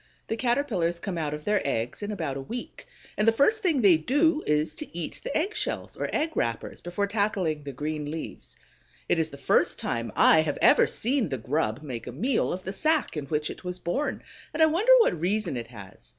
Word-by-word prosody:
The 225 - 0
Caterpillars 230 -9 0
come 190 0 -4
out 150 -2 -2
of 150 - -10
their 210 -1 +2
eggs 120 - -2
in 205 - -4
about 160 -9 -3
a 135 - -4
week, 240 - -7 0.3
and 210 - 0
the - - +8
first 355 - +2
thing 330 - +2
they 185 -5 +7
do 295 - +2
is 150 +1 +1
to 300 - -9
eat 170 - -4
the - - -1
egg 370 +7 -1
shells, 425 - -3
or - - -3
egg 315 +2 0
wrappers, 115 -1 -2
before 175 +4 -2
tackling 200 -7 0
the 145 -1 -6
green 150 +2 -4
leaves. 160 +1 -7 0.5
It 170 - +2
is 160 -1 0
the 140 - -10
first - - +2
time 115 -1 -3
I 160 - +6
have 150 -2 -2
ever - - +6
seen 245 - 0
the 135 - -2
grub 125 +1 -1
make 125 -6 -6
a - - -4
meal 225 - 0
of 185 +1 -4
the 190 - -4
sack 310 - +1
in 145 -3 -4
which 150 0 -1
it - - -11
was 180 0 -4
born, 220 +12 -2 0.3
and 320 - +4
I - - +9
wonder 350 +10 +3
what 175 - +2
reason 190 -3 0
it 120 -2 -5
has. 100 - -12
175 Hz, 220 wpm, -27 LUFS, 150-245 Hz, 0.5 s, I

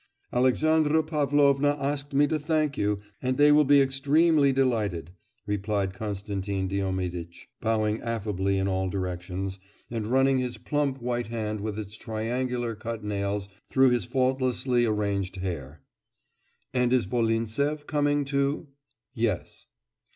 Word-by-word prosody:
'Alexandra 155 +5 +3
Pavlovna 145 -1 +2
asked 145 +1 -2
me 145 +1 +4
to 155 +1 -1
thank 155 -1 0
you, 105 -3 0 0.2
and 130 0 0
they 145 0 +6
will 150 +1 +6
be 145 0 +5
extremely 140 +2 +3
delighted,' 110 - 0 0.3
replied 100 -1 -1
Konstantin 100 -1 -3
Diomiditch, 90 -3 -3 0.2
bowing 110 -1 0
affably 100 -4 -1
in 95 0 0
all 95 -1 0
directions, 90 +1 -4 0.3
and 110 -3 -3
running 135 +2 +3
his 125 -1 -3
plump 145 -2 -1
white 120 -2 -1
hand 110 -2 -3
with 105 0 -3
its 105 -1 -6
triangular 120 +2 -2
cut 115 0 -6
nails 100 -1 -2 0.2
through 130 -1 +5
his 120 -6 +1
faultlessly 130 -1 +1
arranged 100 -3 -1
hair. 80 -6 -5 0.9
'And 125 -1 +2
is 125 -4 +3
Volintsev 115 +7 0
coming 145 -1 +1
too?' 140 +2 -1 0.4
'Yes. 110 -6 -2
115 Hz, 130 wpm, -27 LUFS, 100-140 Hz, 0.9 s, they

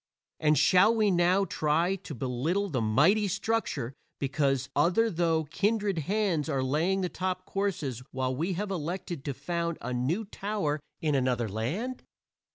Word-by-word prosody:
And 150 -1 +3
shall 200 +5 +5
we 215 -3 +3
now 180 +2 +3
try 165 +3 +1
to 175 -6 -8
belittle 140 - -1
the 130 -7 -1
mighty 150 - +4
structure 200 - -1 0.2
because 135 -1 0
other 225 +6 +3
though 165 -2 +1
kindred 205 +3 0
hands 180 -2 0
are 135 -3 0
laying 165 +9 +1
the 180 - 0
top 185 +2 -3
courses 160 - -2
while 130 0 -2
we 170 +7 -1
have 200 +3 -3
elected 170 -3 -4
to 140 -3 -3
found 170 +3 -2
a 125 +1 -4
new 145 - 0
tower 195 -7 -2 0.2
in 155 -2 +1
another 125 -3 +1
land? 155 - -3
170 Hz, 155 wpm, -29 LUFS, 140-195 Hz, 0.2 s, shall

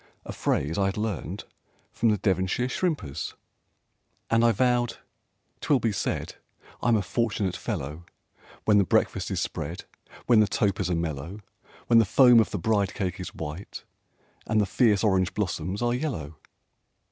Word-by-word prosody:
a - - -6
phrase 80 +7 -1
I 100 - +2
had 95 - -3
learned 105 -5 -3 0.5
from 115 - +1
the 105 - +2
Devonshire 95 +4 0
shrimpers. 125 - -2 1.0
And 115 0 +4
I 120 - +5
vowed 120 +2 +1 0.6
"'Twill 140 - +2
be 115 - 0
said 100 - -3 0.4
I'm 120 -1 +3
a 105 - +1
fortunate 105 -3 -1
fellow, 85 - -5 0.6
When 105 -1 +5
the - - +5
breakfast - - +1
is - - -1
spread, - - -4 0.4
When 120 -3 +5
the 105 - +4
topers 100 -1 0
are 90 - +1
mellow, 85 +4 -4 0.4
When 115 -1 +5
the 115 - +4
foam 125 +3 +6
of 110 - +2
the - - -3
bride 105 -3 0
cake 95 -1 -3
is 90 - -7
white, 80 +5 -7 0.6
and 110 0 +2
the 105 - +3
fierce 105 0 +2
orange 95 -1 +2
blossoms 95 0 -2
are 120 0 +1
yellow!" 120 - -4
105 Hz, 160 wpm, -26 LUFS, 90-115 Hz, 1.0 s, foam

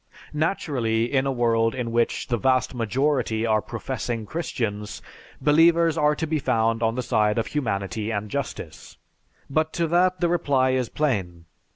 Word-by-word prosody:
Naturally, 130 -8 0
in 135 0 +2
a - - +1
world 115 -2 +1
in 120 -3 -3
which 120 0 0
the 120 - 0
vast 130 +2 +1
majority 120 -1 0
are 110 -1 +2
professing 115 -1 -4
Christians, 105 -7 -4 0.4
believers 165 +3 +4
are 150 -1 +2
to 160 - -2
be 155 0 -1
found 115 -4 +1
on 115 0 +1
the 125 - -2
side 105 -1 +1
of 115 - +1
humanity 110 -5 -2
and 105 -1 -2
justice. - - -6 0.5
But 155 +3 0
to 170 - 0
that 180 +2 +2
the 175 - +2
reply 140 -7 +2
is 130 -2 0
plain. 95 - -2
125 Hz, 160 wpm, -24 LUFS, 115-150 Hz, 0.5 s, believers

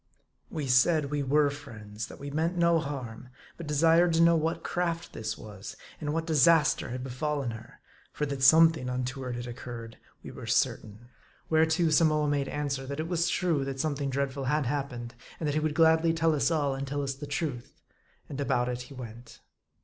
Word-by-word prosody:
We 155 -3 -4
said 140 +3 +3
we 145 -1 0
were 145 +1 +3
friends; 110 -7 -8
that - - -11
we 140 0 -6
meant 165 +4 -1
no 170 -1 +4
harm; 130 -5 -6 0.3
but 170 - -8
desired 165 +3 +4
to 165 - +3
know 170 0 +6
what 165 +1 -1
craft 170 -1 -2
this 110 0 -4
was; 105 -2 -9 0.2
and 150 -1 -3
what 165 +1 -1
disaster 155 -2 +4
had 125 +1 -5
befallen 135 0 -2
her; 110 0 -11 0.3
for 150 - -2
that 140 -2 -4
something 160 -1 +6
untoward 125 0 -3
had 120 0 -5
occurred, 120 -1 -8 0.2
we - - -8
were - - -9
certain. 110 +3 -1 0.4
Whereto, 160 +1 +3
Samoa 155 -1 +3
made 145 -1 0
answer, 140 -2 -3
that 140 +2 -5
it 160 - -2
was 170 -1 0
true 170 -6 +1
that 135 0 -5
something 140 -1 -1
dreadful 135 0 -2
had 150 +2 +1
happened; 125 -3 -3 0.3
and 160 - -3
that 145 - 0
he 155 - +1
would 155 -1 -1
gladly 160 0 +4
tell 165 -1 +2
us 150 - +2
all, 145 -4 +1
and 135 +1 -4
tell 145 +1 -2
us 135 -1 -2
the 140 +2 -8
truth. 140 -4 -4 0.5
And 140 0 -5
about 125 -3 +1
it 125 0 -3
he 140 - -11
went. 120 -1 -10
145 Hz, 195 wpm, -28 LUFS, 125-160 Hz, 0.5 s, know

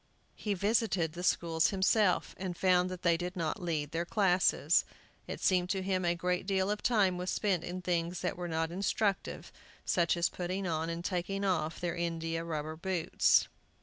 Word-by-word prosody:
He 205 -2 -2
visited 195 -5 +1
the 175 - -6
schools 165 -2 +2
himself, 195 0 +2
and 185 -2 -4
found 180 -1 +3
that 185 -1 -7
they 170 -2 +4
did 180 +1 -4
not 165 +2 -2
lead 155 -4 -2
their 165 +1 -1
classes. 185 0 +3 0.4
It - - -5
seemed 180 -1 +2
to 190 -1 -1
him 185 -1 0
a 170 0 +2
great 180 +2 -1
deal 195 0 +1
of 210 - -2
time 195 -7 +2
was 180 +1 -3
spent 190 -5 0
in 180 +1 -5
things 175 0 -1
that - - -1
were 175 0 -5
not 165 0 -1
instructive, 195 +2 -1 0.3
such 170 -1 +2
as 170 - +3
putting 185 +2 -4
on 165 -1 -1
and 170 +1 -5
taking 195 +2 -2
off 160 -4 0
their 175 -1 -2
india 165 -1 -2
rubber 155 -1 -4
boots. 175 0 +2
180 Hz, 180 wpm, -31 LUFS, 170-190 Hz, 0.4 s, they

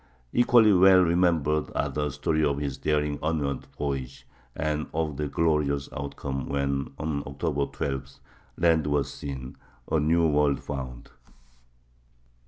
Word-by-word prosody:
Equally 120 -3 +5
well 95 0 +7
remembered 85 -3 +2
are - - +1
the 75 0 -2
story 80 +3 0
of 70 -2 +1
his 70 -2 -3
daring 75 -1 0
onward 75 -4 -1
voyage, 70 -3 -4 0.3
and 75 0 -1
of 80 -2 -1
the 75 +1 -2
glorious 70 -2 0
outcome 70 -2 -4
when, 70 -1 -1
on 75 -2 -2
October 70 +1 -1
12, 70 -1 -5 0.4
land 80 -3 +3
was 70 -2 0
seen,—a 65 +1 -5
new 80 +2 +3
world 75 -2 +2
found. 65 -4 -7
75 Hz, 125 wpm, -27 LUFS, 70-80 Hz, 0.4 s, well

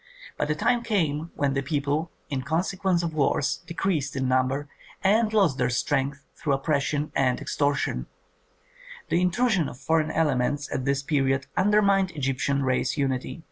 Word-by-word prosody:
But - - -2
a 150 - +1
time 240 +10 +2
came 165 -9 0
when 140 -1 0
the 135 - 0
people, 145 +3 -1 0.2
in 140 -4 -2
consequence 175 +4 0
of 165 -2 -2
wars, 140 -1 +1
decreased 165 -5 -1
in 130 -1 0
number 130 +3 +1 0.4
and 215 +3 +3
lost 195 -12 +2
their 125 -1 +2
strength 135 +2 -1
through 145 - -1
oppression 145 +1 0
and 130 -2 +2
extortion; 140 - -1 1.0
the 175 - +2
intrusion 185 - +2
of - - -11
foreign 155 +3 +1
elements 145 -2 0
at 130 - -2
this 140 0 0
period 135 -3 +1
undermined 200 -1 +3
Egyptian 140 0 0
race 130 +2 0
unity. 135 +2 -2
145 Hz, 150 wpm, -26 LUFS, 135-170 Hz, 1.0 s, and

